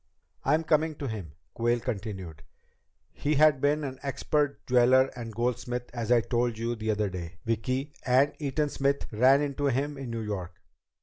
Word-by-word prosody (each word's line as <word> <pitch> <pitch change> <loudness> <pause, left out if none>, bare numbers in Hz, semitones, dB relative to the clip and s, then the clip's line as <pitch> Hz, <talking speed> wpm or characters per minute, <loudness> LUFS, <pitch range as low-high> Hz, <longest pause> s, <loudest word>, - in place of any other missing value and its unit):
"I'm 160 +1 +2
coming 155 0 +2
to 140 - -5
him," 100 - -6 0.2
Quayle 120 +1 +1
continued. 100 - -5 0.7
"He 150 +2 -1
had 150 -2 +5
been 150 +1 +2
an 130 -2 -5
expert 140 +1 -1
jeweler 130 +1 +4
and 115 -2 -6
goldsmith 120 +1 -2
as 120 -1 -3
I 120 -1 +6
told 120 0 0
you 115 +1 -2
the 110 -1 -4
other 105 -2 0
day, 85 -2 -7
Vicki, 130 +6 -1
and 130 +3 +3
Eaton 150 0 0
Smith 140 0 0
ran 130 +6 +5
into 145 0 -1
him 140 +2 -1
in 135 -3 -6
New 115 -1 -3
York. 95 -5 -5
125 Hz, 170 wpm, -28 LUFS, 115-140 Hz, 0.7 s, I